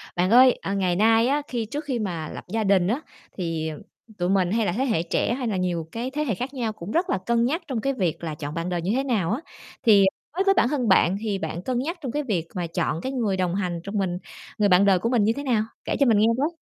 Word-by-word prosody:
Bạn 180 +2 +1
ơi, 250 +2 +6
ờ, 195 - -3
ngày 185 -3 +1
nay 225 +4 +4
á, 285 +3 +1
khi 235 -3 -2
trước 290 +7 -5
khi 260 -4 -2
mà 170 -7 -3
lập - - -8
gia 220 +4 -1
đình 195 -3 +3
á, 240 +9 0 0.4
thì, 165 -3 -2
ừm, 150 - -8 0.4
tụi 175 -1 -1
mình 190 -2 +2
hay 225 +1 +1
là 175 - +1
thế 245 +9 -1
hệ 220 -11 +1
trẻ 175 +6 0
hay 250 -1 -3
là 205 - -1
nhiều 175 -3 -2
cái 240 +3 -4
thế 300 +2 -1
hệ 240 -9 -1
khác 255 +8 -5
nhau 235 -5 -2
cũng 200 -1 -8
rất 350 +6 +1
là - - +1
cân 235 0 +2
nhắc 315 +8 0
trong 250 -5 -2
cái 275 +3 0
việc 180 - -2
là 160 -2 -3
chọn 150 -1 -6
bạn 165 +2 -3
đời 175 -1 -1
như 180 +4 -1
thế 265 - +1
nào 215 -10 0
á. 230 - 0 0.4
Thì, 205 -4 +6
ờ, - - +5 0.3
đối 380 - +3
với 390 0 +4
bản 295 - +3
thân 265 -5 -1
bạn 190 -1 +4
thì 210 -3 -1
bạn 165 -1 -4
cân 245 +5 -1
nhắc 330 +8 -3
trong 260 -5 -4
cái 295 +4 -2
việc 185 - -2
mà 175 -2 -2
chọn 165 0 -2
cái 260 - -3
người 225 -8 -1
đồng 180 -1 0
hành 180 -4 -2
trong 200 +3 -4
mình 185 -3 -1 0.4
người 205 -1 +3
bạn 185 +2 +5
đời 195 -2 +4
của 230 - -1
mình 240 -4 +3
như 220 +2 +3
thế 285 - -5
nào? 235 -6 +1 0.2
Kể - - -1
cho 280 - +5
mình 230 -4 +4
nghe 215 - +4
với. 285 +3 +2
210 Hz, 295 wpm, -24 LUFS, 180-250 Hz, 0.4 s, ơi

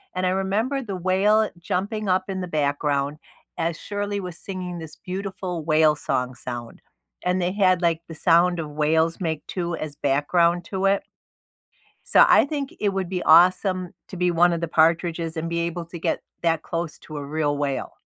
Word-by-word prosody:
and 185 0 0
I - - +3
remember 205 +9 0
the 200 -6 -5
whale 200 +4 +3
jumping 200 +3 -2
up 185 +1 +2
in 190 -1 -3
the 180 - -4
background 145 -1 0 0.4
as 165 0 -1
Shirley 205 0 -3
was 180 -3 -7
singing 180 -3 -6
this 160 -1 -9
beautiful 185 -3 -5
whale 155 -1 +4
song 130 -3 -2
sound, 120 -2 -7 0.4
and 180 +1 +1
they 175 +1 0
had, 185 -3 +3
like, 165 -1 +2
the 165 - -9
sound 175 +2 +3
of 155 - -3
whales 160 +3 +1
make 160 -3 -2
two 175 -2 -3
as 150 -3 -6
background 170 +5 +2
to 190 0 -2
it 195 0 +1 1.1
so - - +9
I - - +6
think 285 -2 -4
it 205 - +2
would 190 -2 -2
be 180 -2 -2
awesome 180 +2 +4 0.2
to 190 - -7
be 180 0 +2
one 175 +1 +4
of 170 - -2
the 170 - -1
Partridges, 165 +1 +1
and 165 +1 -3
be 170 0 -1
able 170 0 -3
to 170 +1 -9
get - - -1 0.2
that 165 -2 +2
close 170 -2 -4
to 155 -1 -9
a 140 - -5
real 145 -1 -1
whale. 140 -2 -2
175 Hz, 190 wpm, -24 LUFS, 160-185 Hz, 1.1 s, so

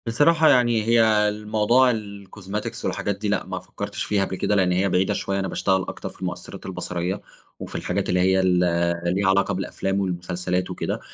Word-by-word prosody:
بصراحة، 155 +7 +4
يعني 120 -3 +3
هي 115 +1 +4 0.3
الموضوع 105 +4 +2
الcosmetics 100 -1 -6
والحاجات 100 -1 -2
دي 105 +1 -3
لأ، 105 - 0
ما - - -4
فكّرتش - - -6
فيها 100 -2 +1
قبل 95 - -5
كده، 105 - 0
لإن 95 -2 +3
هي 95 +2 +2
بعيدة 90 +1 +2
شوية. 100 0 -2
أنا 95 - -1
باشتغَل 95 0 +1
أكتر - - -6
في - - -18
المؤثِّرات - - -6
البصَريَّة 90 +3 -3 0.4
وفي - - -8
الحاجات - - -2
اللي 90 - +2
هي 95 +1 +3
ال 90 -1 +3 0.6
ليها 95 0 +2
علاقة 95 0 +2
بالأفلام 95 +1 -2
والمسلسلات 90 0 -2
وكده، - - -3
100 Hz, 180 wpm, -23 LUFS, 95-105 Hz, 0.6 s, بصراحة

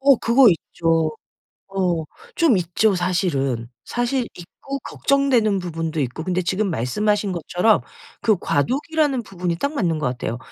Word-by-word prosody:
어 275 -1 +6
그거 235 +2 +5
있죠. 165 -1 0 0.6
어 180 -4 0 0.3
좀 320 - +4
있죠, 185 +4 +1
사실은. 140 - -1 0.2
사실 245 +1 -1
있고 275 +10 -7
걱정되는 250 -8 +1
부분도 165 -2 -3
있고. 130 +5 -3
근데 185 0 0
지금 190 +4 0
말씀하신 200 - 0
것처럼 175 - +2 0.4
그 215 -4 +3
과도기라는 270 - 0
부분이 180 -4 -3
딱 280 - -2
맞는 170 - 0
것 140 - 0
같아요. 120 -1 -3
185 Hz, 295 characters per minute, -22 LUFS, 165-235 Hz, 0.6 s, 어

